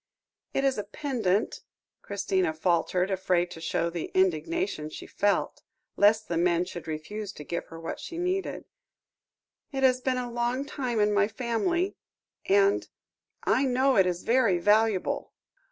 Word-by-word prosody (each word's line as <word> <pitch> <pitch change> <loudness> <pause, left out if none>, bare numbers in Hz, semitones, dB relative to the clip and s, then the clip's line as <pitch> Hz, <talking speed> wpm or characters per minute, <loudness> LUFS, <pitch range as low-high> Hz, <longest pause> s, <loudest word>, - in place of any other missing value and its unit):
"It 275 - +1
is 270 -5 +2
a - - -2
pendant," 215 -4 -1 0.4
Christina 190 -5 -1
faltered, 180 +3 +1
afraid 180 -2 +1
to 165 - -9
show 170 +1 -1
the 170 -1 -4
indignation 185 - 0
she - - -8
felt, 205 0 0 0.3
lest 215 +2 +4
the 170 - -1
men 175 0 +2
should 175 -2 -8
refuse 190 +7 -5
to 150 - -9
give 170 +3 -4
her 165 - -10
what 165 - -5
she 335 - -7
needed; 365 +2 -2 1.1
"it 270 -1 -2
has 255 -1 +4
been 255 0 0
a 245 -1 -3
long 240 +3 -1
time 255 -6 -2
in 210 0 +3
my 200 0 +3
family 260 - -1 0.5
and 395 +1 +3 0.6
I 270 - +3
know 260 +1 +3
it 190 -2 +5
is 175 -1 -2
very 230 -6 +3
valuable." 210 +1 +2
210 Hz, 155 wpm, -28 LUFS, 180-260 Hz, 1.1 s, it